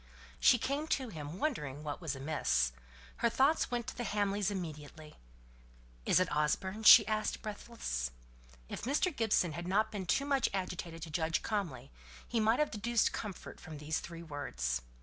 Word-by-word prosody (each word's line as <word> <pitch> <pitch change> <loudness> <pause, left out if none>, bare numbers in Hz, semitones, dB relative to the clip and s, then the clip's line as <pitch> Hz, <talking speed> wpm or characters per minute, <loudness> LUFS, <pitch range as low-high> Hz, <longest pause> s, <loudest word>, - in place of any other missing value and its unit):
She 245 - +6
came 280 +6 -2
to 265 -5 0
him, 155 -3 -7
wondering 150 - -2
what 150 +3 -5
was 155 -5 -2
amiss. 135 - +1 0.5
Her 235 - +2
thoughts 275 +7 +3
went 240 -1 -2
to - - -6
the 240 - -3
Hamleys 205 -2 0
immediately. 155 -5 -7 0.9
"Is - - +5
it 185 -4 0
Osborne?" 190 +8 0
she 220 0 +10
asked, 215 +1 -1
breathless. 205 - -4 0.6
If - - -6
Mr. 290 +6 +1
Gibson 220 -7 +2
had 170 +3 -5
not 215 +4 +2
been 195 -4 -5
too 275 +10 +2
much 275 -3 +2
agitated 180 -3 -4
to 160 - -7
judge 160 +1 0
calmly, 155 - -3 0.4
he 235 - 0
might 220 +2 +3
have 300 0 +1
deduced 230 +2 +1
comfort 205 -5 -6
from 160 -3 -9
these 150 +2 -2
three 170 0 -8
words. 65 - -3
190 Hz, 170 wpm, -33 LUFS, 150-225 Hz, 0.9 s, she